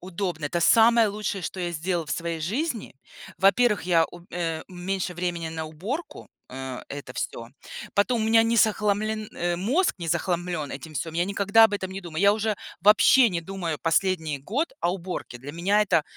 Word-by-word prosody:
удобно! 180 -4 -3
Это 170 +4 -2
самое 230 +4 +6
лучшее, 205 -2 -3
что 185 - -5
я 175 -1 -2
сделала 170 0 -2
в - - -8
своей 170 -1 -3
жизни. 235 - -3 0.4
Во-первых, 205 +3 +3
я 165 -2 +4
у 175 - -12
а, 165 -2 -2
у - - -15
меньше 180 0 -3
времени 175 -2 -3
на 160 0 -5
уборку, 230 - -6 0.2
а, 130 0 -6
это 140 -3 -7
всё. 115 0 -4 0.5
Потом 225 +3 +2
у - - 0
меня 225 0 +5
не 230 +1 +1
захламлен, 215 0 +1
а, 175 0 -1
мозг 265 - +1
не 170 - -5
захламлён 170 -2 -1
этим 155 +3 -8
всём. 160 +4 -4
Я 175 +1 +1
никогда 200 +3 +4
об 220 - +2
этом 190 -2 -3
не 195 - -5
думаю. 170 -1 -4
Я 200 0 +6
уже 215 -1 -1 0.3
вообще 220 +5 +6
не 170 - -2
думаю 170 -3 -4
последний 160 -4 0
год 275 - -1
о 175 - +1
уборке. 180 -9 -6
Для 140 +4 -8
меня 195 +6 +2
это 165 -4 +4
180 Hz, 190 wpm, -25 LUFS, 165-210 Hz, 0.5 s, самое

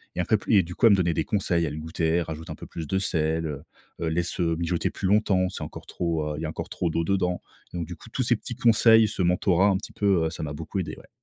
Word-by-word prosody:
et - - -4
après 95 +5 +2
pl 105 - -2
et 95 - +5
du 90 +1 -8
coup - - +2
elle 110 - +8
me 100 - +6
donnait 85 -3 +1
des - - 0
conseils, 90 -4 0
elle 75 0 -4
goûtait, 80 +1 -2
elle - - +2
rajoutait 80 0 -7
un - - -5
peu - - -10
plus 80 -2 -6
de 95 - 0
sel, 80 -3 0
heu 75 -2 -4 0.4
heu: 85 - 0
«Laisse 85 +2 -2
mijoter 85 0 0
plus 95 - -3
longtemps, 95 -2 +3
c'est 85 - -6
encore 75 - -8
trop, 80 -3 -2
heu, - - -8
il - - -5
y - - -2
a - - -2
encore - - -6
trop 85 - -1
d'eau 85 +1 0
dedans». 90 -1 0 0.3
Donc 85 -2 -3
du 85 - -7
coup, 115 - -15
tous 130 - -1
ces 120 0 +3
petits 120 +3 -7
conseils, 115 -2 +5
ce 95 - -3
mentorat 90 +2 +3
un 95 - +2
petit - - -9
peu, 95 -5 +2
heu, 80 - 0
ça 80 - -6
m'a 75 -1 -4
beaucoup 80 +6 -4
aidé, 90 - -4
ouais. - - -15
85 Hz, 295 wpm, -26 LUFS, 80-100 Hz, 0.4 s, elle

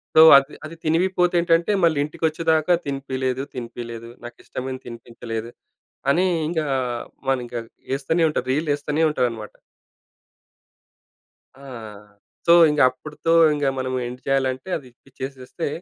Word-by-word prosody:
So, 155 - +9 0.2
అది 140 +1 0
అది 165 - -10
తినివిపోతే 180 +2 +2
ఏంటంటే 170 +2 +2
మళ్ళీ 165 -3 +4
ఇంటికి 150 - -11
వచ్చేదాకా, 160 +1 +1
"తినిపియలేదు, 130 -2 -2
తినిపియలేదు 115 -1 -7 0.2
నాకు 120 0 -9
ఇష్టమైనది 130 0 -6
తినిపించలేదు" 115 -1 -7 0.6
అని 180 +6 +2 0.2
ఇంకా 165 -2 -1 0.7
మనం 135 -1 +2
ఇంకా 120 0 -4 0.3
వేస్తూనే 145 +5 0
ఉంటారు, 150 - -3
రీల్ 155 +3 -1
వేస్తూనే 145 +2 -1
ఉంటారన్నమాట. 115 -7 -2 2.1
ఆ! - - -11 0.8
సో, 170 - +8 0.2
ఇంక 150 0 0
అప్పటితో 150 +5 -3 0.2
ఇంక 145 -1 -1
మనం 130 0 -2
ఎండ్ 125 +1 -8
చేయాలంటే 135 +3 0
అది 135 -5 -13 0.2
ఇచ్చేసేస్తే 135 +4 -6
135 Hz, 120 wpm, -22 LUFS, 125-160 Hz, 2.1 s, సో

